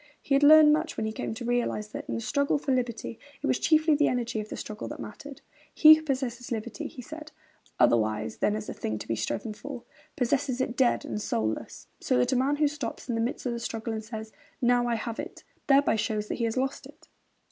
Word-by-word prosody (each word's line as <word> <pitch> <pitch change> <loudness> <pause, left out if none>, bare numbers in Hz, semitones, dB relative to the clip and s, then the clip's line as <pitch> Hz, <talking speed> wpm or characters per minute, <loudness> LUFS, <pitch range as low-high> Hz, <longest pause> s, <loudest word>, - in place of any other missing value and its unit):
He 280 - -2
had 275 - +4
learned 300 +1 +8
much 315 +2 -1
when 220 - -1
he 220 - -2
came 220 - -4
to 235 - -6
realise 235 -3 -1
that, - - -8
in - - -1
the - - -3
struggle 280 +5 +1
for 280 -1 -2
liberty, 235 -3 -2 0.2
it - - 0
was - - +1
chiefly 315 -1 +4
the 295 0 +3
energy 240 -3 -1
of 215 0 -6
the - - -6
struggle 215 -1 -6
that - - -7
mattered. 280 +6 -9 0.3
'He 310 0 +10
who 315 - +2
possesses 260 -4 -3
liberty,' 225 -1 -4
he 250 - -10
said, 310 +3 -9 0.5
'otherwise 110 -2 +2
than 210 - +1
as 215 0 -5
a - - -4
thing 110 0 -3
to - - -8
be 115 - 0
striven 120 - -3
for, 255 +2 -8 0.3
possesses 255 0 0
it 255 -2 -1
dead 250 -1 +2
and 210 - -4
soulless.... 110 - -3
So - - +1
that 125 - +2
a - - +2
man 265 +3 +2
who 300 0 +3
stops 285 -4 -5
in - - 0
the 225 - 0
midst 240 +4 -3
of 245 - 0
the 235 - -4
struggle 230 -1 -4
and 220 0 -4
says, 220 0 -7 0.3
"Now 245 0 +3
I 235 - +1
have 230 0 -4
it," - - -7 0.2
thereby 275 -4 +4
shows 210 0 -2
that - - -1
he 235 - +1
has 225 +2 -2
lost 270 +1 -2
it.' - - -18
240 Hz, 240 wpm, -28 LUFS, 220-275 Hz, 0.5 s, He